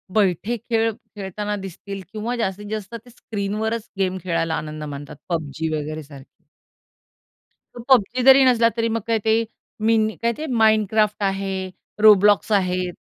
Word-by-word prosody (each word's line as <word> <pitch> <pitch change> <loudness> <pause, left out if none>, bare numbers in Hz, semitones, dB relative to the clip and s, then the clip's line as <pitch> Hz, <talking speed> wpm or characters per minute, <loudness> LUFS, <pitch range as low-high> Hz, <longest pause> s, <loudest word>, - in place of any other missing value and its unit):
बैठे 210 +3 +1
खेळ 225 0 0
खेळताना 210 -2 -6
दिसतील 195 +2 -8
किंवा 225 +3 -3
जास्तीत 205 -3 -3
जास्त 215 +1 -5
ते - - -15
स्क्रीनवरच 220 0 -4
गेम 185 -1 0
खेळायला 165 -2 -1
आनंद 155 0 -5
मानतात. 145 0 -7 0.2
PUBG 160 -1 -2
वगैरे 155 +1 -5
सारखी. 140 -1 -15 1.3
पण 240 - -8
PUBG 250 -1 +3
जरी 265 0 +8
नसला 235 -2 +4
तरी, 230 0 +1
मग 225 0 -1
काय 230 -1 +1
ते, 225 +1 +3 0.4
मिन 220 0 +3
काय 235 0 +2
ते 315 - -4 0.2
Minecraft 215 -1 +3 0.2
आहे. 195 -1 -4 0.3
Roblox 210 0 +6
आहेत. 180 -1 -1
210 Hz, 140 wpm, -22 LUFS, 185-225 Hz, 1.3 s, जरी